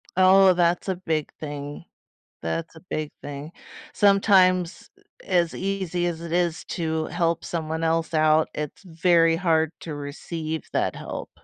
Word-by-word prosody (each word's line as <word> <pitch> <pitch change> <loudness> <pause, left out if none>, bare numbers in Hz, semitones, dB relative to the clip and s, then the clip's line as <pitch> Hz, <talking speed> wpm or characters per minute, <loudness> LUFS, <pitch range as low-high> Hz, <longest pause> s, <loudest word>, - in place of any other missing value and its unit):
Oh, 190 +1 +6
that's 175 +1 +1
a 190 - 0
big 160 -4 -2
thing. 145 -1 -6 0.6
That's 80 - -3
a 160 - -11
big 155 -1 -3
thing. 145 +2 -7 0.4
Sometimes, 190 -3 +3
eh, - - -26 0.4
as 170 -2 +1
easy 185 -3 -2
as 165 -1 -4
it 170 -1 -7
is 175 -1 0
to 160 -2 -2
help 170 -1 -1
someone 160 -1 -3
else 165 0 0
out, 155 0 +3
it's 150 +6 -5
very 165 -1 +3
hard 160 -3 +2
to 160 - -6
receive 155 +2 -5
that - - 0
help. - - -6
165 Hz, 145 wpm, -24 LUFS, 155-180 Hz, 0.6 s, Oh